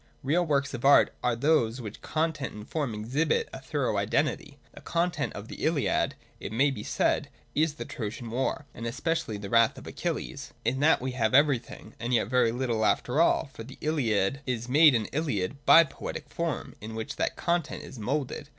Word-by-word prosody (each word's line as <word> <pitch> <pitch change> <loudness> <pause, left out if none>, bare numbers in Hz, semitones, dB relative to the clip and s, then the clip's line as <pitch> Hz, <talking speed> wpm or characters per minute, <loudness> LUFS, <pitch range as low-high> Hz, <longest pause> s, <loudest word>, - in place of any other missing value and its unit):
Real 155 +7 +2
works 140 -4 0
of 120 - -5
art 140 +1 +6
are 125 -1 +2
those 125 -3 +2
where 110 -4 -5
content 155 -4 -2
and 105 0 -9
form 145 -8 -2
exhibit 140 - 0
a - - -6
thorough - - -1
identity. - - -1 0.2
The - - -12
content 175 +1 -1
of 105 +1 -8
the - - -8
Ihad, 155 -3 +1 0.2
it - - -6
may 135 +6 +3
be 125 - -5
said, - - 0 0.2
is 155 -1 +1
the - - -6
Trojan 115 +1 -6
war, 130 +4 -1
and 115 - -5
especially 150 -1 -2
the 100 -1 -7
wrath 115 -1 +4
of - - -10
Achilles. - - -4
In 130 - +1
that 155 -1 +4
we 130 +1 -2
have 115 -2 +1
everything, 140 -4 +1
and 120 +2 0
yet 110 -2 +1
very 125 -2 +3
little 120 -2 -1
after 125 +7 +2
all; 160 -4 +2
for 115 - -8
the 130 +3 -12
Iliad 135 -5 0
is 120 -2 -2
made 145 +1 +6
an 110 -2 +1
Iliad 140 - -2
by 165 - +9
the 155 - -10
poetic - - -6
form, - - -3
in 110 +1 -7
which 110 +6 -5
that - - -1
content 170 -2 -1
is 130 - -10
moulded. 140 +5 -3
130 Hz, 195 wpm, -28 LUFS, 115-150 Hz, 0.2 s, by